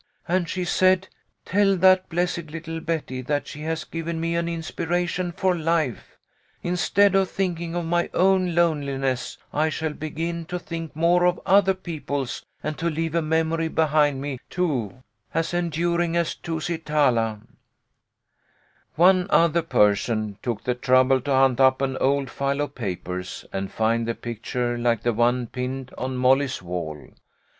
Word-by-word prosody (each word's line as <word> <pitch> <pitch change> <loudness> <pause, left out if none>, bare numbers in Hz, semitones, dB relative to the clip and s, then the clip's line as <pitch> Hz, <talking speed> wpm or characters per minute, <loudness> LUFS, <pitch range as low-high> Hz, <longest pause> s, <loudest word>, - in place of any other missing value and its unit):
And 175 -1 0
she 180 0 -2
said, 185 +1 +3 0.2
' - - -48
Tell 195 -1 +3
that 185 0 +4
blessed 170 -1 -1
little 165 +1 -6
Betty 160 -6 -3
that 145 +2 -1
she 150 - -8
has 160 +1 -2
given 165 0 -4
me 165 +1 -1
an 170 0 0
inspiration 175 +2 -2
for 185 0 +1
life. 160 -6 -1 0.5
Instead 180 +3 +3
of 195 -1 +3
thinking 170 -3 -2
of 175 -1 -2
my 175 +1 0
own 185 -2 +3
loneliness 140 -6 0 0.2
I 155 +2 +2
shall 155 0 -3
begin 165 +2 -4
to 180 - -4
think 165 -3 -6
more 175 +2 +3
of 180 - +1
other 195 -1 +4
people's 145 -7 -4 0.2
and 155 0 -3
to 170 - 0
leave 165 0 -2
a 170 - +2
memory 160 +1 0
behind 150 -3 +2
me, 140 -3 -4
too, 130 - -2 0.3
as 165 +1 0
enduring 170 0 0
as 170 -1 0
Tusi 165 0 -4
talaV 120 -9 +1 0.8
" - - -56 0.7
One 180 +2 +5
other 170 0 +4
person 105 -6 +1
took 120 -4 -3
the 125 - 0
trouble 130 +1 +3
to 140 +2 -3
hunt 130 -2 +4
up 130 0 +5
an 135 -1 -1
old 140 0 +1
file 140 +1 -1
of 145 - -3
papers, 90 -4 -5
and 95 0 -3
find 115 +1 0
the 115 - -1
picture 120 +1 -3
like 120 -2 +1
the 120 - +1
one 120 +2 +2
pinned 130 +2 -5
on 130 0 -3
Molly's 130 +1 +2
wall. 85 -5 -6
155 Hz, 160 wpm, -24 LUFS, 130-170 Hz, 0.8 s, One